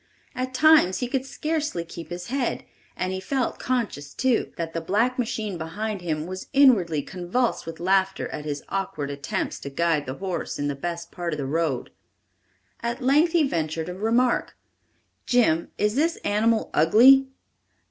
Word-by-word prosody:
At 255 0 -4
times 305 - +5
he 245 - -2
could 265 +1 -2
scarcely 305 - -2
keep 165 -1 -9
his 175 +4 -6
head, 265 0 -1 0.3
and 185 0 -2
he 190 - -3
felt 255 +6 -2
conscious, 215 - -2
too, 255 -3 +1
that 165 -1 -4
the 165 - -2
black 225 +9 +1
machine 215 -6 -2
behind 200 +5 -4
him 155 -3 -2
was 185 +1 -7
inwardly 195 - +4
convulsed 185 +5 -2
with 165 -1 -7
laughter 190 +2 +1
at 150 - -6
his 145 -1 -4
awkward 155 -7 -3
attempts 140 0 -3
to 140 - -6
guide 155 0 0
the 130 - -4
horse 185 -1 -4
in 145 - -1
the - - -1
best 170 +3 -5
part 175 -2 -3
of - - -3
the 140 - -3
road. 150 -3 -1 0.9
At 235 +2 -3
length 300 +6 +4
he 320 -4 +4
ventured 160 - -2
a - - -4
remark: 230 +6 +1 0.7
"Jim, 195 -10 +3
is 210 0 +1
this 320 +6 +1
animal 220 +2 +1
ugly?" 250 - +6
190 Hz, 170 wpm, -25 LUFS, 165-250 Hz, 0.9 s, ugly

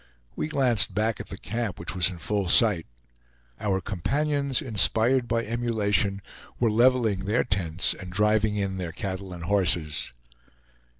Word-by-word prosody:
We - - -2
glanced 130 -9 +2
back 110 +1 0
at - - -7
the - - -8
camp, 115 0 -4
which 85 +2 -5
was 90 -2 +2
in 90 - -8
full 100 +3 -2
sight. 100 -3 +4 0.7
Our 95 -2 0
companions, 140 - -1
inspired 120 0 +2
by 115 0 0
emulation, 105 -4 0 0.4
were 115 -3 +2
leveling 115 -4 +2
their 110 +5 +1
tents 95 -5 -1
and 90 -2 -9
driving 105 +2 +2
in 100 -2 -2
their 85 -3 -4
cattle 95 +1 -5
and 85 -2 -8
horses. 85 -5 +1
105 Hz, 145 wpm, -26 LUFS, 95-115 Hz, 0.7 s, sight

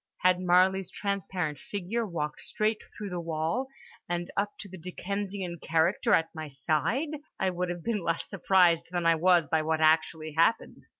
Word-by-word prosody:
Had 180 0 +4
Marley's 185 +1 +3
transparent 185 -6 -3
figure 210 +4 -3
walked 150 -5 -4
straight 215 0 -1 0.2
through 205 -2 -5
the 180 - -3
wall 165 +10 -1 0.4
and 175 0 -2
up 205 0 0
to 205 - -7
the 190 - -10
Dickensian 185 0 -4
character 165 +4 +3
at 165 0 +1
my 155 -2 -6
side, 155 - 0 0.3
I 190 - +1
would 180 0 -2
have 175 -1 -5
been 225 -4 -1
less 165 0 -1
surprised 180 -4 +3
than 175 -1 -2
I 165 - +6
was 170 0 +4
by 160 +1 +2
what 160 0 0
actually 155 0 +2
happened. 165 +8 +1
175 Hz, 170 wpm, -29 LUFS, 160-195 Hz, 0.4 s, I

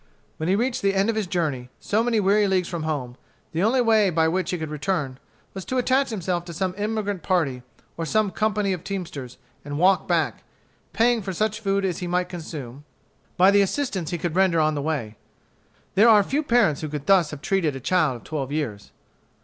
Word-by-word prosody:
When 160 +2 -2
he 190 - +4
reached 240 +4 -1
the 195 0 +1
end 195 +4 +2
of - - -6
his 215 -3 -1
journey, 150 -9 -2
so 215 +2 0
many 235 -2 +1
weary 205 +1 +3
leagues 185 -2 +1
from 170 -3 -4
home, 140 -6 -3 0.3
the 165 +1 -1
only 235 +6 +3
way 220 -4 +4
by 160 -2 +2
which 185 +2 -1
he 180 - -1
could 160 -2 -5
return 145 -3 -2 0.3
was 190 - -6
to 260 - -2
attach 265 +2 +2
himself 180 -5 -2
to 170 -2 -8
some 185 +1 -1
emigrant 205 -2 -2
party 155 -9 0 0.4
or 165 - -2
some 215 0 +1
company 210 -2 0
of 180 -2 -6
teamsters, 165 -10 -6 0.3
and 145 0 -5
walk 185 +3 +3
back, - - 0 0.5
paying 235 0 +2
for 190 -1 -4
such 215 +3 -1
food 200 -2 0
as 180 -3 -2
he 180 - -4
might 180 +1 0
consume, 150 -6 -7 0.5
by 185 +2 +6
the 200 0 +5
assistance 195 - -1
he 175 - -2
could 170 0 -3
render 185 -3 +3
on 155 0 +2
the 145 - -2
way. 140 -8 -3 0.8
There 215 +5 +6
are 210 -2 +7
few 280 +9 -1
parents 235 - +2
who 155 - -4
could 145 -1 -5
thus 185 -4 +4
have 150 0 -9
treated 170 -8 0
a - - -5
child 155 -2 +1
of 120 - -11
twelve 140 -4 -4
years. 125 -10 -4
180 Hz, 215 wpm, -24 LUFS, 155-205 Hz, 0.8 s, are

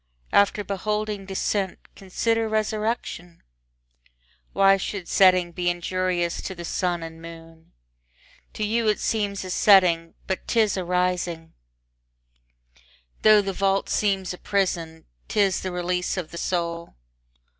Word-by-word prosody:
After 205 +1 +3
beholding 210 0 -3
descent, 195 0 -1 0.2
consider 225 +4 -1
resurrection; 215 -5 -3 1.1
Why 195 0 +5
should 190 -1 -5
setting 185 -2 +4
be 175 +1 -1
injurious 175 0 -1
to 190 - -6
the 170 -1 -7
sun 175 -1 -1
and 165 0 -9
moon? 165 -1 -13 0.8
To 215 - -4
you 225 +1 0
it 210 - +2
seems 205 -3 -1
a 185 - -5
setting, 180 -5 +4
but 190 - -4
'tis 220 -4 +2
a 185 - -2
rising; 180 -2 -1 1.7
Tho' 215 -1 +7
the 195 0 -3
vault 195 +1 0
seems 195 -3 0
a 180 - -11
prison, 170 -5 -2 0.2
'tis 200 -3 +1
the 185 - -4
release 180 +1 -2
of 175 -4 -4
the 170 - -8
soul. 170 -1 -3
185 Hz, 125 wpm, -24 LUFS, 175-205 Hz, 1.7 s, Tho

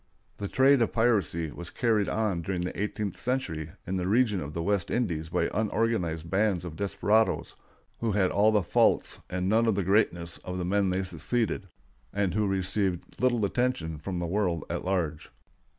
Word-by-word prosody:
] - - -40
The 100 - -3
trade 135 +4 +4
of 115 - +1
piracy 100 -9 +1
was 85 +2 -8
carried 110 -4 +1
on 105 -6 0
during 90 +1 -2
the 90 +2 -3
eighteenth 105 -2 -3
century 90 - -2 0.2
in 95 +1 -2
the 90 0 -1
region 105 -2 +2
of 75 +1 -7
the 85 - -2
West 100 -2 0
Indies 85 -10 -1
by - - +1
unorganized 105 -6 0
bands 95 -1 +1
of 80 -3 -6
desperados 105 +4 +1 0.4
who 115 -3 0
had 95 -2 +2
all 105 +2 +4
the 105 -3 +2
faults - - +2
and 90 0 -2
none 115 +3 +3
of 110 - +3
the 100 - 0
greatness 85 -3 +1
of 90 0 -6
the 90 - -2
men 100 +1 +2
they 95 +1 0
succeeded, 95 +4 -2 0.4
and 100 -3 0
who 105 0 +1
received 95 0 -1
little 120 -4 +3
attention 100 -9 -1
from 90 +4 -4
the 85 - -2
world 85 -3 0
at - - -3
large. 85 -5 -2
95 Hz, 185 wpm, -28 LUFS, 85-110 Hz, 0.4 s, trade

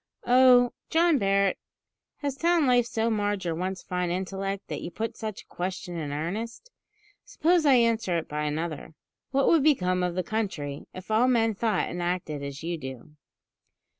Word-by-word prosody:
"Oh! 245 -1 +6 0.2
John 330 -3 +3
Barret, 195 -1 +2 0.6
has 285 -2 -2
town 335 +1 +2
life 245 -2 +3
so 230 -1 0
marred 205 -3 -1
your 170 - 0
once 185 +2 -4
fine 180 -1 -2
intellect, 195 +2 -3
that - - -5
you - - -5
put 225 +5 -4
such 215 -3 -6
a - - -37
question 180 -1 -5
in 155 -4 -4
earnest? 220 - -4 0.5
Suppose 335 -1 +2
I 270 - +7
answer 230 -7 +2
it 165 - -4
by 150 0 -3
another: 155 0 -4 0.3
What 275 0 +2
would 330 -3 +5
become 185 -12 +2
of 180 -1 -1
the 185 - 0
country 165 -9 -3
if 185 +3 -9
all 225 +4 +4
men 225 -3 +3
thought 220 +2 0
and 175 +1 -5
acted 175 -4 -2
as 140 +2 -6
you 170 0 -3
do?" 130 +2 -8
195 Hz, 175 wpm, -27 LUFS, 175-240 Hz, 0.6 s, I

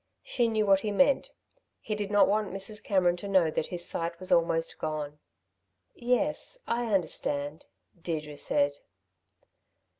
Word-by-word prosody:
She 240 -2 +1
knew 220 -1 +1
what 195 -1 +5
he 210 - -3
meant. 275 +7 +3 0.5
He 215 - -4
did 205 -1 -3
not 205 -1 +5
want 210 0 0
Mrs. 195 +3 -5
Cameron 180 -3 +2
to 200 - -7
know 185 -5 +3
that 155 - -1
his 175 -1 -2
sight 170 0 -3
was 185 - -4
almost 165 -1 +2
gone. 150 -1 -4 0.7
"Yes, 295 - 0
I 235 0 -1
understand," 150 -5 -1 0.3
Deirdre 155 -4 -4
said. 145 -1 +2
190 Hz, 145 wpm, -29 LUFS, 165-215 Hz, 0.7 s, what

